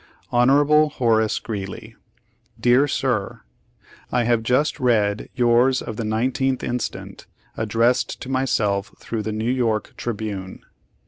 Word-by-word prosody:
"Hon. 145 +5 +4
Horace 110 -5 +1
Greeley: 100 -4 -6 0.6
"Dear 125 +4 +4
Sir: 125 -7 -2 0.7
I 120 -1 +2
have 120 -1 +2
just 125 +6 +1
read 110 -4 +1
yours 125 +2 +3
of 110 - -6
the 115 - -4
19th 130 +4 0
instant, 125 -1 -5 0.3
addressed 115 +3 +1
to - - -7
myself 115 -7 0
through 115 -2 -4
The 110 +1 -3
New 110 +3 -1
York 115 -5 -1
Tribune. 105 -5 -5
120 Hz, 120 wpm, -22 LUFS, 110-130 Hz, 0.7 s, Hon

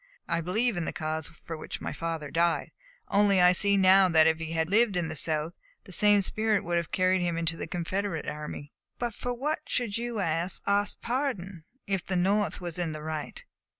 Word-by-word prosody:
I 170 0 0
believe 215 +5 0
in 170 - -1
the - - -2
cause 155 -1 -3
for 165 - -5
which 155 - -7
my - - -4
father 165 -3 -4
died. 170 0 +1 0.4
Only 200 -1 +4
I 180 0 +7
see 200 +2 +2
now 190 0 +6
that 160 -2 +6
if 160 0 +3
he 160 0 -5
had 160 -1 0
lived 205 0 +3
in 170 -2 -1
the 155 - -5
South, 155 +1 0 0.3
the 195 - -13
same 205 +2 +5
spirit 215 0 +2
would 175 0 0
have 170 -2 -2
carried 185 0 +2
him 170 -1 -1
into 165 -1 0
the - - -6
Confederate 175 0 -3
army." 150 -1 -6 0.2
"But 240 -2 -3
for 245 - -4
what 280 +6 -2
should 230 -4 -1
you 240 -1 -4
ask 170 0 -1 0.4
pardon, 200 - -3 0.2
if 195 -3 -1
the 190 - -3
North 200 +3 +1
was 175 -1 -6
in 165 -3 -1
the 155 0 -7
right?" 155 -1 -5
180 Hz, 205 wpm, -28 LUFS, 165-205 Hz, 0.4 s, I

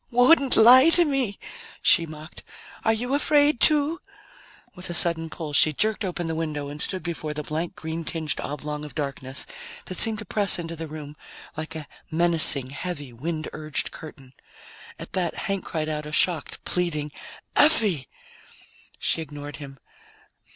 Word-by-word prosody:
"Wouldn't 265 +3 +4
lie 255 +7 +9
to 345 +1 +5
me!" 265 -9 -1 0.5
she 170 -3 +4
mocked. 155 +1 -11 0.4
"Are 225 - +3
you 245 +4 -2
afraid, 290 -1 +2
too?" 305 - +3 0.7
With 180 0 -8
a 175 - -2
sudden 165 -2 +3
pull, 160 -2 -7
she 155 +1 +5
jerked 215 +7 +1
open 175 -2 -4
the 165 - -3
window 155 -3 -4
and 150 +1 -6
stood 185 -1 -1
before 155 -3 -5
the 150 - -4
blank 160 +4 -4
green 160 +1 -6
tinged 160 -2 -4
oblong 150 0 -6
of 150 - -10
darkness 135 -2 -4 0.4
that 185 - -3
seemed 220 -1 +8
to 215 - -8
press 200 -2 +1
into 165 -1 -6
the 165 0 -7
room 150 -1 -9 0.4
like 155 +1 -6
a 155 -2 -7 0.2
menacing, 160 -5 +2
heavy, 145 -4 -6
wind 155 +6 -5
urged 155 -1 -3
curtain. 140 -5 -11 0.6
At - - -10
that 180 -3 -1
Hank 195 -2 -3
cried 155 -2 -4
out 150 -1 -4
a - - -8
shocked, 165 -1 +1
pleading, 155 -4 -2 0.4
"Effie!" 215 - +3 0.9
She 165 - 0
ignored 145 -1 -9
him. 140 -2 -11
165 Hz, 160 wpm, -24 LUFS, 150-200 Hz, 0.9 s, lie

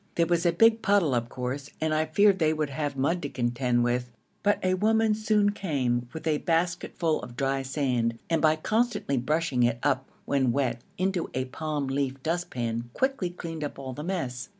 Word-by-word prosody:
There 170 - +3
was 170 +1 +1
a - - +4
big 225 +6 +4
puddle, 195 -9 +3
of 120 -1 0
course, 130 +3 -4
and 155 0 0
I 155 0 +2
feared 195 +5 +4
they 155 -1 +3
would 155 -2 -2
have 145 -1 -3
mud 165 +7 +1
to 145 - -3
contend 120 -1 0
with, 120 0 0 0.3
but 205 0 +3
a 185 0 +2
woman 220 +3 +3
soon 210 -1 +2
came 130 -11 -1
with 160 - -8
a 155 -2 +1
basketful 170 -1 0
of 120 - -9
dry 135 +1 0
sand, 125 -4 0
and 165 - +1
by 155 0 +5
constantly 215 - 0
brushing 145 0 0
it 120 -1 +3
up 135 -2 +1 0.2
when 130 -3 +2
wet 120 -2 0 0.2
into 185 -2 0
a 130 0 0
palm 150 +2 -3
leaf 135 0 -2
dustpan 120 -9 -2
quickly 265 -9 0
cleaned 165 -3 -6
up 145 - -5
all 135 -1 -6
the 150 - -6
mess. 160 -8 -3
150 Hz, 195 wpm, -27 LUFS, 130-175 Hz, 0.3 s, by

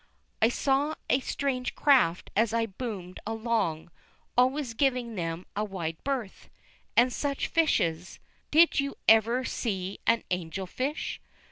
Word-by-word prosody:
I 225 - +6
saw 280 +4 +1 0.2
strange 260 -2 -2
craft 250 - +3
as 225 +1 +2
I 230 0 +2
boomed 195 -4 -6
along, 220 -8 -1 0.4
always 255 0 +2
giving 250 -2 0
them 170 -2 -4
a 210 - 0
wide 170 -6 -5
berth. 260 -8 -4 0.5
And 245 +1 +5
such 280 -1 -1
fishes! 180 - +1 0.3
Did 325 +1 +5
you 280 0 -1
ever 230 +3 +5
see 195 -4 -3
an 230 0 +3
angel 180 +1 -3
fish? 265 - -3
230 Hz, 125 wpm, -28 LUFS, 185-265 Hz, 0.5 s, I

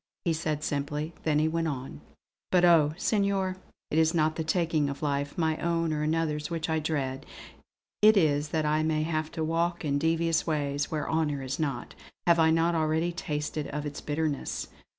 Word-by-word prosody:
he 170 - +2
said 155 -2 -2
simply, 150 +3 -2
then 155 -2 +3
he 155 +1 +3
went 165 +1 0
on: 130 - -5 0.5
"But 180 -1 +5
oh! 160 -3 +5
Senor, 195 -3 0 0.3
it 155 - +3
is 160 +1 +3
not 155 -1 +2
the 160 - -2
taking 160 -3 +1
of 140 +2 -6
life, 140 -1 -1
my 160 -2 +1
own 165 -1 0
or 150 - -1
another's, 155 -1 0
which 165 -1 -2
I 160 - +2
dread. 140 -4 -2 0.8
It 215 0 +7
is 150 -4 +3
that 155 -1 0
I 155 +1 +2
may 155 -1 +1
have 155 -1 -2
to 160 - -2
walk 170 +2 0
in 140 -1 +1
devious 165 +1 +1
ways, 145 -2 -1
where 150 -2 -2
honour 150 -4 0
is 130 +3 -4
not; 140 -6 -3 0.3
have 170 -1 +5
I 160 0 +5
not 165 +1 +3
already 160 +1 +1
tasted 150 -4 -3
of 150 +1 -4
its 145 -1 -5
bitterness! 150 -1 -2
155 Hz, 190 wpm, -28 LUFS, 150-165 Hz, 0.8 s, It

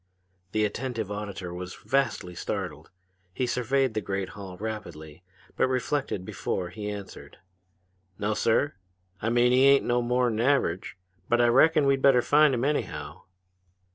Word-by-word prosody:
The 110 0 +1
attentive 110 -1 -3
auditor 100 -4 -5
was 90 +1 -7
vastly 115 -10 -1
startled. - - -5 0.5
He 130 - 0
surveyed 130 +1 0
the 110 - -1
great 95 -2 -3
hall 95 0 -9
rapidly, 85 -7 -7 0.3
but - - +2
reflected 130 -6 -2
before 90 -1 -3
he 105 +3 -6
answered. 100 -1 -9 0.8
"No, 105 +1 -1
sir 115 +7 +1 0.5
I 110 - 0
mean 120 +1 +3
he 130 +2 +5
ain't 140 0 +5
no 120 0 +2
more'n 120 -2 +1
average! 115 -10 +1 0.3
But 120 - +3
I 120 0 +5
reckon 150 +5 +5
we'd 135 -1 +2
better 130 -3 +5
find 150 -2 +4
him, 120 +2 -1
anyhow." 145 0 -3
115 Hz, 145 wpm, -27 LUFS, 100-130 Hz, 0.8 s, he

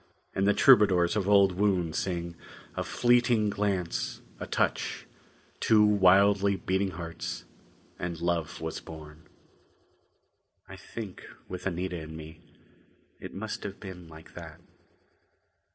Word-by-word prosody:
And 95 +1 +1
the 105 - +4
troubadours 100 -8 +5
of 100 -2 0
old 100 -2 +6
would 90 -4 +1
sing: 85 -2 -2 0.4
"A - - -1
fleeting 120 -3 +3
glance; 100 -4 -2 0.2
a - - -5
touch; - - -1 0.5
two 105 -1 +5
wildly 100 0 +5
beating 95 +1 -1
hearts 85 -9 -6 0.5
and 85 -2 -4
love 85 -2 -1
was - - -4
born." 80 0 -12 1.4
I - - -10
think, 105 -5 -8 0.2
with 90 +1 -5
Anita 90 -1 -3
and 80 0 -8
me, 80 +1 -10 0.8
it - - -9
must 110 +2 -5
have 100 -1 -7
been 90 -4 -9
like 80 0 -14
that. - - -10
95 Hz, 120 wpm, -29 LUFS, 85-100 Hz, 1.4 s, old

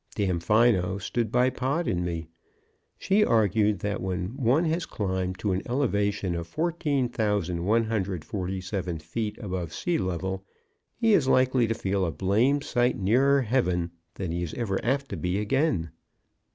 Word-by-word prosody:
Damfino 100 0 +2
stood 110 +3 -2
by 125 +1 +3
Pod 140 +7 -1
and 90 0 0
me. 85 -2 -3 0.7
She 205 +2 +3
argued 105 - +2
that 105 0 -2
when 95 +4 -3
one 135 +5 +2
has 165 +1 -1
climbed 95 -2 -2
to 100 +1 -1
an 95 +1 0
elevation 105 -7 0
of 85 -1 -4
14,147 105 - -1
feet 105 +7 -4
above 95 -6 -4
sea 175 -2 -1
level 95 +1 -2 0.5
he 225 -2 +3
is 150 -9 +4
likely 130 -2 +3
to 115 - -1
feel 95 -2 -1
a 85 - 0
blamed 115 - +2
sight 125 -2 +1
nearer 130 +8 +3
heaven 90 -8 0 0.2
than 90 -4 -4
he 85 +1 -2
is 85 -3 -4
ever 105 -6 -2
apt 140 +3 0
to - - -4
be 90 +1 -1
again. 105 - 0
105 Hz, 145 wpm, -27 LUFS, 90-130 Hz, 0.7 s, is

